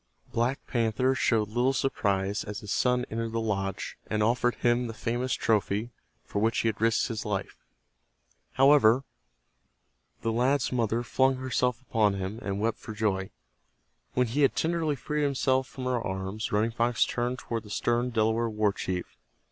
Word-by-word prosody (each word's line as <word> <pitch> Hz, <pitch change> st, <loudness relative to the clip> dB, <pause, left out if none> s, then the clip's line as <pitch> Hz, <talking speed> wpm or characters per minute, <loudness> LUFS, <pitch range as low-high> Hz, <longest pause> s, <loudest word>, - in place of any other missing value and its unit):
Black 120 Hz, +4 st, 0 dB
Panther 120 Hz, +2 st, +1 dB
showed 110 Hz, -5 st, +1 dB
little 120 Hz, +4 st, +2 dB
surprise 100 Hz, -7 st, 0 dB
as 105 Hz, +1 st, -6 dB
his 105 Hz, -2 st, -7 dB
son 125 Hz, 0 st, +2 dB
entered 115 Hz, 0 st, -3 dB
the 115 Hz, -, 0 dB
lodge, 95 Hz, -4 st, -3 dB
and 105 Hz, -1 st, 0 dB
offered 120 Hz, +2 st, +2 dB
him 120 Hz, 0 st, +1 dB
the 115 Hz, -, -7 dB
famous 120 Hz, +3 st, -2 dB
trophy 105 Hz, +2 st, 0 dB, 0.3 s
for 100 Hz, -, -3 dB
which 110 Hz, +2 st, +1 dB
he -, -, 0 dB
had 110 Hz, -, -5 dB
risked 115 Hz, 0 st, +3 dB
his 115 Hz, -4 st, -4 dB
life. 105 Hz, -2 st, -3 dB, 1.0 s
However, 135 Hz, -3 st, +5 dB, 1.2 s
the 115 Hz, -, +1 dB
lad's 125 Hz, +3 st, +1 dB
mother 115 Hz, -1 st, 0 dB
flung 130 Hz, +2 st, +2 dB
herself 125 Hz, -1 st, 0 dB
upon 110 Hz, -5 st, +1 dB
him, 100 Hz, +3 st, -4 dB
and 100 Hz, -3 st, -3 dB
wept 115 Hz, +2 st, 0 dB
for 110 Hz, -, -8 dB
joy. 95 Hz, -3 st, 0 dB, 0.9 s
When 125 Hz, -, +3 dB
he 125 Hz, +6 st, -1 dB
had 140 Hz, -, +4 dB
tenderly 160 Hz, -2 st, 0 dB
freed 150 Hz, +3 st, -2 dB
himself 130 Hz, -2 st, +1 dB
from 130 Hz, -, -8 dB
her 125 Hz, -2 st, 0 dB
arms, 95 Hz, +2 st, -4 dB
Running 110 Hz, +3 st, +2 dB
Fox 120 Hz, 0 st, +2 dB
turned 125 Hz, +1 st, -2 dB
toward 115 Hz, -2 st, -4 dB
the 105 Hz, -, -14 dB
stern 120 Hz, +3 st, 0 dB
Delaware 115 Hz, 0 st, +1 dB
war 105 Hz, -2 st, +1 dB
chief. 90 Hz, -2 st, -3 dB
115 Hz, 165 wpm, -28 LUFS, 105-125 Hz, 1.2 s, However